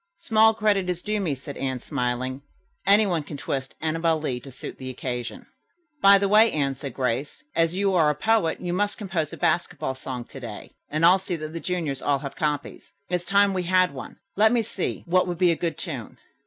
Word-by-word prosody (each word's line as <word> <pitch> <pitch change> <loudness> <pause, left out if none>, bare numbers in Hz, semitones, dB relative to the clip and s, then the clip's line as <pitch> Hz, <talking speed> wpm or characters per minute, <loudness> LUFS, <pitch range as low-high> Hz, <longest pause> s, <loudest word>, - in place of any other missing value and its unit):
"Small 220 0 +4
credit 205 -4 +1
is 175 -1 -2
due 210 0 -1
me," 165 -8 -1
said 140 +2 -9
Anne, 130 -1 -2
smiling. 130 0 -2 0.5
"Anyone 200 -5 +4
can 145 0 -8
twist 135 -1 -4
'Annabel 165 0 +1
Lee' 130 -5 -2
to 135 - -12
suit 130 - -8
the 130 - -6
occasion." 125 -1 -5 0.6
"By 200 0 +8
the 200 0 +1
way, 215 +3 +6
Anne," 140 -3 0
said 135 -1 -7
Grace, 130 - -2
"as 165 +1 +2
you 195 0 +1
are 160 -4 +4
a 150 - +1
poet, 220 -6 +1
you 175 -1 -3
must 205 +2 0
compose 175 -7 -2
a - - -8
basketball 170 -5 0
song 130 -2 -5
to 135 - -11
day, 115 -5 -8 0.2
and 155 +2 +2
I'll 185 +3 +7
see 190 -1 -3
that 155 -1 -6
the 165 - -4
juniors 165 -7 -2
all 145 -1 +2
have 140 0 -7
copies. 150 -3 -3 0.2
It's 175 0 -1
time 200 +1 +4
we 185 - 0
had 185 -2 +2
one. 135 - -9 0.2
Let 215 +2 +5
me 240 -2 +2
see 195 - -4
what 185 +1 +2
would 175 -1 -3
be 180 -1 +4
a - - +1
good 165 0 -3
tune?" 135 - -6
165 Hz, 215 wpm, -25 LUFS, 135-190 Hz, 0.6 s, By